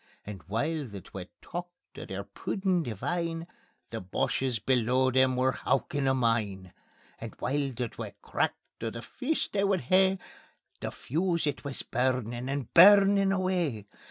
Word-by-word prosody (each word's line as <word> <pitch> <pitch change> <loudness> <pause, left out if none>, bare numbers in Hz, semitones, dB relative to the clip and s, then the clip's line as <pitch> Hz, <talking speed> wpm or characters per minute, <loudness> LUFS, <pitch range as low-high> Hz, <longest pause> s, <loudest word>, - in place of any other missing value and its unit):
And 100 -3 -7
while 145 - -1
the 100 -3 -8
twa 90 +1 -9 0.2
talked 175 +1 -8
o' - - -6
their - - -5
puddin' 190 -3 -1
divine 165 - -2 0.5
The 115 - -4
Boches 120 +7 -1
below 125 +3 +2
them 130 0 +4
were 130 +1 +3
howkin' 135 +2 0
a 130 - +3
mine. 105 -7 0 0.5
And - - -7
while 140 0 -1
the 125 0 -3
twa - - -8
cracked - - -3
o' 115 - 0
the 115 +1 -7
feast 290 +4 -2
they 200 -1 +2
would 195 -2 +2
hae, 190 +7 +4 0.6
The - - -3
fuse 170 +4 -1
it 145 -2 -2
wis 140 -2 -3
burnin' 125 -1 -1
and 140 -3 -3
burnin' 195 +2 +7
away. 180 - 0
135 Hz, 155 wpm, -29 LUFS, 120-175 Hz, 0.6 s, burnin